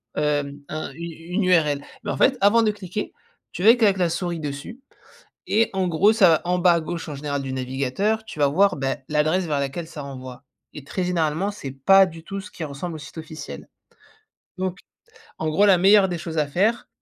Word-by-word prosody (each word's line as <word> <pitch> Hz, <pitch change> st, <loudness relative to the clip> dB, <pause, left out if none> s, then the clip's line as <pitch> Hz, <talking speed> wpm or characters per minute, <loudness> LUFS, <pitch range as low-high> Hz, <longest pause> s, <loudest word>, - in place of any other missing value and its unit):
hem, 145 Hz, -1 st, -1 dB
un 155 Hz, -2 st, -5 dB
une 170 Hz, +2 st, -7 dB
une 175 Hz, +5 st, -3 dB
url. 150 Hz, -6 st, +2 dB, 0.2 s
Mais 205 Hz, -, -5 dB
en -, -, -3 dB
fait 265 Hz, -, +3 dB
avant 225 Hz, +3 st, +5 dB
de 215 Hz, -, +3 dB
cliquer, 205 Hz, 0 st, -6 dB, 0.4 s
tu -, -, -7 dB
vas 225 Hz, +3 st, +8 dB
que 235 Hz, -3 st, +2 dB
avec 195 Hz, -1 st, +3 dB
la 175 Hz, -2 st, +2 dB
souris 170 Hz, 0 st, -3 dB
dessus 150 Hz, -, -6 dB, 0.6 s
et 225 Hz, +2 st, +2 dB
en 190 Hz, -1 st, 0 dB
gros 180 Hz, +6 st, +4 dB
ça 205 Hz, -6 st, +5 dB
va 160 Hz, -, +3 dB
en 180 Hz, 0 st, +1 dB
bas 175 Hz, -1 st, +5 dB
à 170 Hz, -, +1 dB
gauche 165 Hz, +1 st, -5 dB
en 150 Hz, -, -5 dB
général 140 Hz, -1 st, -3 dB
du 130 Hz, -1 st, -4 dB
navigateur 135 Hz, +12 st, -1 dB
tu 180 Hz, -8 st, -10 dB
vas 145 Hz, -, +4 dB
voir, 185 Hz, +6 st, +3 dB
beh, 135 Hz, -1 st, -1 dB
l'adresse 155 Hz, +4 st, +1 dB
vers 150 Hz, -3 st, -1 dB
laquelle 140 Hz, +5 st, -3 dB
ça 155 Hz, -3 st, -8 dB
renvoie. 130 Hz, -1 st, -9 dB, 0.3 s
Et 145 Hz, -, -9 dB
très 160 Hz, +6 st, -3 dB
généralement 175 Hz, +2 st, 0 dB
c'est 145 Hz, -9 st, -7 dB
pas 190 Hz, +8 st, +5 dB
du 165 Hz, -1 st, -11 dB
tout 195 Hz, +2 st, -6 dB
ce 210 Hz, -, -11 dB
qui 165 Hz, -, -8 dB
ressemble 155 Hz, +3 st, -5 dB
au -, -, -5 dB
site 150 Hz, +2 st, -10 dB
officiel. 155 Hz, 0 st, -9 dB, 0.9 s
Donc, 185 Hz, 0 st, -2 dB, 0.6 s
en 160 Hz, -, -2 dB
gros 200 Hz, +7 st, +4 dB
la 190 Hz, -2 st, +6 dB
meilleure 195 Hz, +2 st, +5 dB
des 175 Hz, -, -3 dB
choses 160 Hz, -1 st, -5 dB
à 150 Hz, -, +2 dB
faire 200 Hz, +11 st, 0 dB
170 Hz, 220 wpm, -23 LUFS, 145-195 Hz, 0.9 s, vas